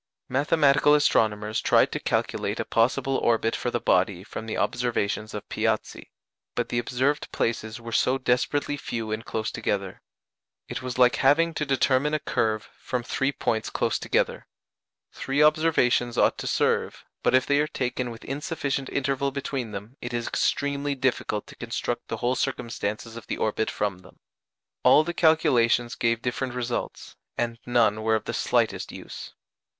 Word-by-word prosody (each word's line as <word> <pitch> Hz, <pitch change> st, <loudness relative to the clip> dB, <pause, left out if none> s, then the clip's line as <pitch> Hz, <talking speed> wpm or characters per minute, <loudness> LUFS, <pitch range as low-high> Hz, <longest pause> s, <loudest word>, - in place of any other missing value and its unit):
Mathematical 145 Hz, +1 st, +4 dB
astronomers 110 Hz, -6 st, +2 dB
tried -, -, +4 dB
to -, -, -2 dB
calculate -, -, -1 dB
a -, -, -1 dB
possible 130 Hz, +3 st, +1 dB
orbit 115 Hz, -1 st, +1 dB
for 125 Hz, -, -2 dB
the 120 Hz, -, -1 dB
body 90 Hz, -2 st, +1 dB
from 110 Hz, +2 st, -7 dB
the 110 Hz, -, -3 dB
observations 110 Hz, -3 st, -1 dB
of 105 Hz, -, -6 dB
Piazzi, -, -, -2 dB, 0.5 s
but -, -, -1 dB
the 120 Hz, -, 0 dB
observed 130 Hz, +5 st, -1 dB
places 115 Hz, 0 st, -2 dB
were 115 Hz, 0 st, -8 dB
so 130 Hz, +3 st, +2 dB
desperately 135 Hz, +3 st, 0 dB
few 115 Hz, -5 st, -4 dB
and 110 Hz, +1 st, -3 dB
close 110 Hz, 0 st, -2 dB
together. 100 Hz, -4 st, -3 dB, 0.7 s
It -, -, -5 dB
was 125 Hz, -1 st, -5 dB
like 125 Hz, -1 st, +5 dB
having 165 Hz, +5 st, +4 dB
to 150 Hz, -2 st, -2 dB
determine 140 Hz, +2 st, +2 dB
a -, -, 0 dB
curve 110 Hz, -7 st, -1 dB
from 125 Hz, -1 st, -3 dB
three 135 Hz, +3 st, 0 dB
points 110 Hz, -5 st, -1 dB
close -, -, 0 dB
together. -, -, 0 dB, 0.6 s
Three 140 Hz, +2 st, 0 dB
observations 150 Hz, -6 st, +3 dB
ought -, -, +3 dB
to -, -, -4 dB
serve, -, -, 0 dB, 0.2 s
but -, -, +3 dB
if 130 Hz, -, +4 dB
they 145 Hz, 0 st, +2 dB
are 150 Hz, -, +2 dB
taken 125 Hz, -3 st, -2 dB
with 115 Hz, -1 st, -10 dB
insufficient 140 Hz, -1 st, -3 dB
interval 140 Hz, 0 st, 0 dB
between 135 Hz, -3 st, -4 dB
them 105 Hz, +6 st, -8 dB
it 120 Hz, 0 st, -4 dB
is 120 Hz, 0 st, -2 dB
extremely 140 Hz, 0 st, 0 dB
difficult 125 Hz, -5 st, -1 dB
to -, -, -13 dB
construct 120 Hz, 0 st, -4 dB
the 115 Hz, -, -3 dB
whole 120 Hz, +3 st, 0 dB
circumstances 115 Hz, -4 st, -3 dB
of 115 Hz, -, -10 dB
the -, -, -3 dB
orbit 110 Hz, 0 st, 0 dB
from 100 Hz, -3 st, -2 dB
them. 90 Hz, -, -18 dB, 0.6 s
All 150 Hz, -, +6 dB
the 175 Hz, +2 st, -3 dB
calculations 120 Hz, -8 st, +3 dB
gave 115 Hz, 0 st, 0 dB
different 125 Hz, 0 st, -2 dB
results, 120 Hz, -1 st, -4 dB, 0.2 s
and 115 Hz, -1 st, -2 dB
none 110 Hz, -3 st, +3 dB
were 110 Hz, 0 st, +2 dB
of 110 Hz, -, -1 dB
the -, -, -3 dB
slightest -, -, 0 dB
use. -, -, -9 dB
120 Hz, 165 wpm, -26 LUFS, 115-140 Hz, 0.7 s, All